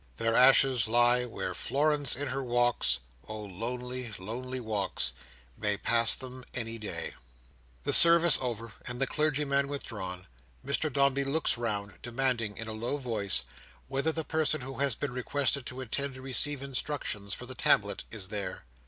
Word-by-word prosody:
Their 115 0 0
ashes 130 -2 +5
lie 120 +2 +4
where 120 - -5
Florence 145 -1 +1
in 140 +1 -2
her 135 +1 -3
walks—oh 110 - -1
lonely, 125 +5 -5
lonely 125 +7 -5
walks!—may 95 - -3
pass 115 +1 +4
them 130 -1 -9
any 115 -1 -3
day. 85 -6 -4 0.7
The - - +1
service 170 -2 +8
over, 115 -3 -3
and 120 0 -3
the 135 - +2
clergyman 140 -1 +1
withdrawn, 95 -10 -6 0.4
Mr 145 +2 0
Dombey 140 0 +2
looks 140 +4 +1
round, 100 -5 -3
demanding 120 -3 -1
in 110 - -6
a 110 - -5
low 120 +6 -3
voice, 110 -8 0 0.4
whether 135 +4 0
the 160 0 -2
person 155 -2 0
who 135 +2 -7
has 140 -4 +2
been 140 0 -4
requested 130 +1 -1
to 130 +1 -6
attend 135 +2 -2
to 130 - -10
receive 135 +1 +2
instructions 130 -7 -3
for 125 - -9
the 130 - -4
tablet, 100 -5 +2
is 100 -4 -6
there? 100 - -4
125 Hz, 155 wpm, -29 LUFS, 110-140 Hz, 0.7 s, service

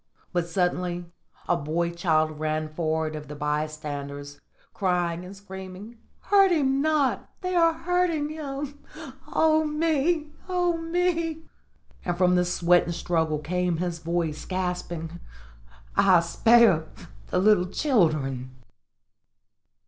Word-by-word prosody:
But 175 -1 0
suddenly 175 0 -1 0.4
a 175 - +3
boy 170 +2 -1
child 155 -3 +1
ran 155 0 -1
forward 155 0 -1
of 150 -1 -7
the 150 - -7
bystanders, 145 -1 -4 0.3
crying 175 -2 0
and 185 +2 -9
screaming, 190 +3 -10 0.2
"Hurt 395 -1 +5
him 275 -4 +2
not! 305 -3 +1
They 365 -1 -2
are 335 -2 +5
hurting 330 -2 0
him 290 -2 -5 0.5
oh, 315 0 +3
me! 305 0 0 0.2
oh, 355 -1 +1
me!" 330 -1 -1 0.6
And 175 -1 -2
from 180 0 +4
the 180 0 +3
sweat 175 0 +3
and 170 - -3
struggle 160 -3 0
came 180 +2 -1
his 175 -1 -3
voice, 165 -2 -2
gasping, 180 -2 -4 0.8
"I 185 -3 +5
spare 195 -1 +4 0.4
the 115 - -1
little 185 -1 +4
children!" 155 - 0
180 Hz, 120 wpm, -26 LUFS, -, 0.8 s, Hurt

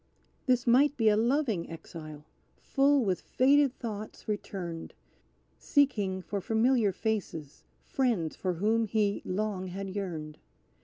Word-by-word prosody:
"This 250 -2 +3
might 275 +5 +4
be 225 -3 +4
a 210 - +4
loving 230 - +1
exile, 155 -2 -9 0.3
full 275 -2 +2
with 185 -3 0
faded 275 0 +3
thoughts 215 -3 -7
returned, 185 -5 -5 0.6
Seeking 205 -10 +1
for 200 +1 -3
familiar 225 +1 +2
faces, 175 -8 -4 0.2
friends 225 - 0
for 185 -1 -2
whom 220 +6 +1
he 210 -1 +1
long 190 -1 -2
had 195 +1 -5
yearned. 160 -6 -5
210 Hz, 120 wpm, -29 LUFS, 185-245 Hz, 0.6 s, might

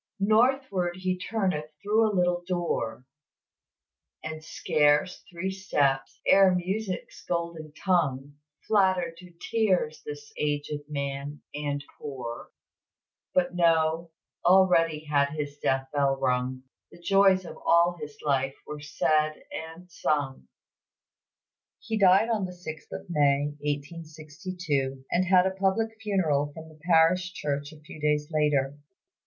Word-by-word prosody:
"Northward 215 -4 +2
he 185 0 -1
turneth 185 -6 -2
through 215 +2 +2
a 210 -3 -1
little 180 0 +1
door, 170 -10 -2 1.2
And 155 0 -6
scarce 150 +1 +1
three 185 +2 -3
steps, 145 -8 0
ere 195 -1 +6
Music's 185 +2 -3
golden 170 -3 -3
tongue, 145 -7 0 0.3
Flattered 185 -5 +2
to 180 0 -13 0.2
tears 185 -9 +1
this 145 0 -8
aged 145 0 -2
man 140 0 -4
and 145 -1 -3
poor; 125 -5 -6 0.9
But 180 -1 +2
no 165 -1 +2 0.3
already 170 -4 +4
had 140 -1 +1
his 145 -1 -5
death 135 0 +1
bell 140 -2 +2
rung, 125 +1 0 0.3
The - - -15
joys 190 +1 +4
of - - -9
all 170 +1 +4
his 150 -1 -8
life 135 -1 +1
were 150 0 -7
said 155 +1 +1 0.2
and 165 +3 -8
sung." 140 - -1 1.3
He 220 -1 -3
died 190 +2 +6
on 210 -4 0
the 180 - -7
6th 160 -3 -9
of - - -7
May, 145 -3 +2
1862, 150 -1 -4
and 180 +2 +2
had 185 -1 +5
a 190 - +1
public 195 +4 0
funeral 160 -9 +1
from 160 0 -9
the 155 -1 -18
parish 180 +3 +4
church 145 -2 -3
a 155 - -14
few 155 0 -12
days 150 0 +1
later. 145 -2 +1
160 Hz, 125 wpm, -27 LUFS, 145-185 Hz, 1.3 s, ere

